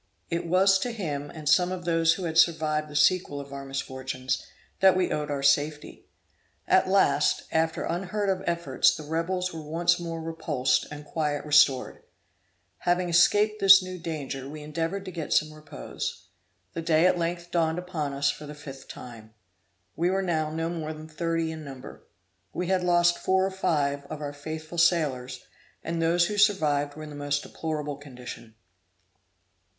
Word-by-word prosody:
It 170 Hz, 0 st, -2 dB
was 190 Hz, +2 st, +4 dB
to 245 Hz, -, -2 dB
him 150 Hz, -11 st, -4 dB
and 155 Hz, -2 st, -9 dB
some 180 Hz, +4 st, +4 dB
of 180 Hz, -2 st, -5 dB
those 165 Hz, -1 st, +3 dB
who 185 Hz, -, -6 dB
had 165 Hz, -2 st, -3 dB
survived 155 Hz, -2 st, +2 dB
the 150 Hz, -, -10 dB
sequel 150 Hz, -1 st, +2 dB
of 140 Hz, 0 st, -9 dB
our 140 Hz, 0 st, -6 dB
misfortunes, 130 Hz, -1 st, -4 dB, 0.4 s
that 190 Hz, -1 st, +5 dB
we 185 Hz, -, +1 dB
owed 150 Hz, -1 st, -2 dB
our 140 Hz, -1 st, -2 dB
safety. 145 Hz, +2 st, 0 dB, 0.6 s
At -, -, +4 dB
last, -, -, +3 dB
after 160 Hz, 0 st, 0 dB
unheard 195 Hz, +4 st, -2 dB
of 190 Hz, -1 st, 0 dB
efforts, 170 Hz, -6 st, +2 dB
the 155 Hz, -, -8 dB
rebels 170 Hz, +4 st, -2 dB
were 160 Hz, -, -6 dB
once 170 Hz, +3 st, +1 dB
more 165 Hz, -1 st, -5 dB
repulsed, 160 Hz, -5 st, 0 dB
and 150 Hz, 0 st, -9 dB
quiet 150 Hz, -1 st, -2 dB
restored. 145 Hz, -3 st, +3 dB, 0.8 s
Having 175 Hz, 0 st, +1 dB
escaped 210 Hz, +5 st, +4 dB
this 195 Hz, -1 st, +8 dB
new 185 Hz, 0 st, -7 dB
danger, 140 Hz, -5 st, -5 dB
we 150 Hz, 0 st, -8 dB
endeavored 165 Hz, +6 st, -3 dB
to 185 Hz, -, -6 dB
get 165 Hz, -3 st, -3 dB
some 155 Hz, 0 st, +2 dB
repose. 155 Hz, -, -6 dB, 0.5 s
The -, -, -4 dB
day 165 Hz, 0 st, +3 dB
at 180 Hz, -1 st, +3 dB
length 170 Hz, +1 st, -3 dB
dawned 165 Hz, -1 st, +1 dB
upon 175 Hz, -5 st, -3 dB
us 140 Hz, 0 st, +1 dB
for 150 Hz, -, -10 dB
the 150 Hz, -, -8 dB
fifth 135 Hz, -2 st, -10 dB
time. 110 Hz, -3 st, -11 dB, 0.6 s
We 175 Hz, +2 st, +1 dB
were 195 Hz, +1 st, 0 dB
now 160 Hz, -4 st, 0 dB
no 165 Hz, +1 st, -2 dB
more 160 Hz, -2 st, -4 dB
than 155 Hz, 0 st, -10 dB
thirty 165 Hz, +1 st, -2 dB
in 160 Hz, -1 st, -7 dB
number. 135 Hz, -3 st, -11 dB, 0.5 s
We 180 Hz, -, -2 dB
had 185 Hz, 0 st, +1 dB
lost 175 Hz, -1 st, +3 dB
four 190 Hz, 0 st, +2 dB
or 195 Hz, -, -2 dB
five 145 Hz, -6 st, -1 dB
of 155 Hz, 0 st, -6 dB
our 145 Hz, -1 st, -5 dB
faithful 155 Hz, +3 st, -6 dB
sailors, 135 Hz, -8 st, +1 dB, 0.4 s
and 165 Hz, 0 st, -2 dB
those 170 Hz, +1 st, +3 dB
who 205 Hz, +3 st, -2 dB
survived 150 Hz, -9 st, +2 dB
were 155 Hz, -, -8 dB
in 150 Hz, -, -8 dB
the -, -, -9 dB
most 145 Hz, 0 st, -1 dB
deplorable 150 Hz, -3 st, -4 dB
condition. 125 Hz, -5 st, -10 dB
160 Hz, 175 wpm, -27 LUFS, 145-175 Hz, 0.8 s, this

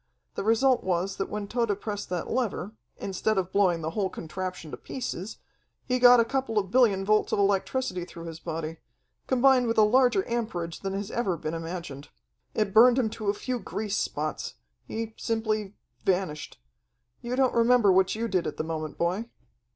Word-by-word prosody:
The -, -, -4 dB
result 240 Hz, +4 st, +3 dB
was 185 Hz, +1 st, -1 dB
that 195 Hz, -, -2 dB
when 210 Hz, -1 st, -4 dB
Tode 225 Hz, -3 st, 0 dB
pressed 205 Hz, -1 st, -5 dB
that 180 Hz, -1 st, -3 dB
lever, 225 Hz, -5 st, -2 dB, 0.3 s
instead 200 Hz, +2 st, -1 dB
of 190 Hz, -1 st, -1 dB
blowing 185 Hz, -4 st, +2 dB
the 160 Hz, -, -2 dB
whole 195 Hz, +1 st, -1 dB
contraption 180 Hz, -1 st, -6 dB
to -, -, -6 dB
pieces, 220 Hz, -5 st, -5 dB, 0.5 s
he 250 Hz, -1 st, 0 dB
got 245 Hz, 0 st, +8 dB
a 230 Hz, -, +4 dB
couple 260 Hz, -3 st, -2 dB
of 195 Hz, -2 st, 0 dB
billion 210 Hz, -6 st, +4 dB
volts 215 Hz, +1 st, +2 dB
of -, -, +1 dB
electricity 200 Hz, 0 st, 0 dB
through 170 Hz, -1 st, -10 dB
his 165 Hz, -1 st, -7 dB
body, 165 Hz, -1 st, -5 dB, 0.5 s
combined 260 Hz, -1 st, +4 dB
with 230 Hz, -, 0 dB
a 215 Hz, -, +7 dB
larger 255 Hz, -, +3 dB
amperage 200 Hz, -9 st, -3 dB
than 195 Hz, -1 st, -4 dB
has 200 Hz, +1 st, -4 dB
ever 195 Hz, -8 st, -1 dB
been 155 Hz, 0 st, -4 dB
imagined. 165 Hz, -4 st, -6 dB, 0.5 s
It 210 Hz, -3 st, 0 dB
burned 240 Hz, +3 st, +7 dB
him 230 Hz, -5 st, +1 dB
to 215 Hz, -2 st, -3 dB
a 200 Hz, -, +1 dB
few 250 Hz, +3 st, -3 dB
grease 210 Hz, -2 st, -3 dB
spots. 155 Hz, +1 st, -3 dB, 0.3 s
He 225 Hz, 0 st, -4 dB
simply 215 Hz, -3 st, -2 dB, 0.3 s
vanished. 180 Hz, -, -1 dB, 0.6 s
You 240 Hz, +1 st, -3 dB
don't 260 Hz, -1 st, +2 dB
remember 235 Hz, -3 st, +5 dB
what 190 Hz, +1 st, +3 dB
you 230 Hz, +1 st, -2 dB
did 185 Hz, -4 st, 0 dB
at -, -, -5 dB
the -, -, -1 dB
moment, 155 Hz, -1 st, -4 dB
boy?" 180 Hz, +6 st, 0 dB
205 Hz, 180 wpm, -27 LUFS, 180-230 Hz, 0.6 s, got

